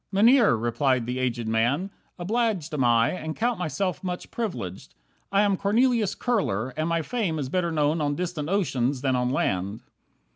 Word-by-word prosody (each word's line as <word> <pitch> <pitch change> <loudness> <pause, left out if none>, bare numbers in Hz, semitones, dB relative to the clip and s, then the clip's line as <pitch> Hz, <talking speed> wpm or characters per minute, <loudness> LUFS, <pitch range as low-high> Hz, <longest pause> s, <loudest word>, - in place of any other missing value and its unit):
"Mynheer," 225 - +5
replied 120 +2 +1
the 125 +2 -3
aged 120 -3 -1
man, 120 - +1 0.3
"obliged 195 -4 -1
Am 140 -4 +1
I, 115 -1 +4
and 160 -3 -5
count 240 -1 0
myself 180 +2 -2
much 180 -1 -5
privileged. 180 - -5 0.4
I 200 +1 +4
am 200 -1 +2
Cornelius 220 +2 +2
Kurler, 130 - -1
and 155 +2 -1
my 165 -1 0
fame 210 -9 -2
Is 135 -4 -3
better 175 +1 0
known 155 0 +1
on 145 -1 0
distant 170 -3 -3
oceans 140 -9 0
than 130 -2 +1
on 125 0 0
land. 100 -4 -1
160 Hz, 170 wpm, -25 LUFS, 125-200 Hz, 0.4 s, Mynheer